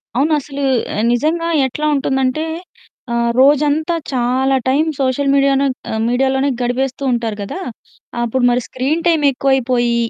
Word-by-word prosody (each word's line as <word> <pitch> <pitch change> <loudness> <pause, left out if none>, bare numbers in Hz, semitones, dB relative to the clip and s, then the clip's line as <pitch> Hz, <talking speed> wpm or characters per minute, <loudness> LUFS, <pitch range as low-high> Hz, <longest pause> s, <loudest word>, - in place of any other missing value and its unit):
అవును. 290 +5 +2
అసలు 280 0 -6 0.5
నిజంగా 330 +6 0 0.2
ఎట్లా 300 +4 -4
ఉంటుందంటే 265 +2 0 0.7
ఆహ్, 235 0 +1
రోజంతా 295 +4 +3 0.2
చాలా 260 +1 +1
టైమ్ 295 +5 +2
సోషల్ 270 +1 0
మీడియానన్ 275 -1 +2 0.2
ఆహ్, 220 - -2
మీడియాలోనే 265 +3 +1
గడిపేస్తూ 260 +2 -2
ఉంటారు 230 -3 -2
కదా! 200 - -6 0.6
అప్పుడు 245 +2 -1
మరి 245 +1 +1
స్క్రీన్ 285 +6 -2
టైమ్ 325 -3 +2
ఎక్కువైపోయి. 250 -3 +1
265 Hz, 125 wpm, -17 LUFS, 245-285 Hz, 0.7 s, రోజంతా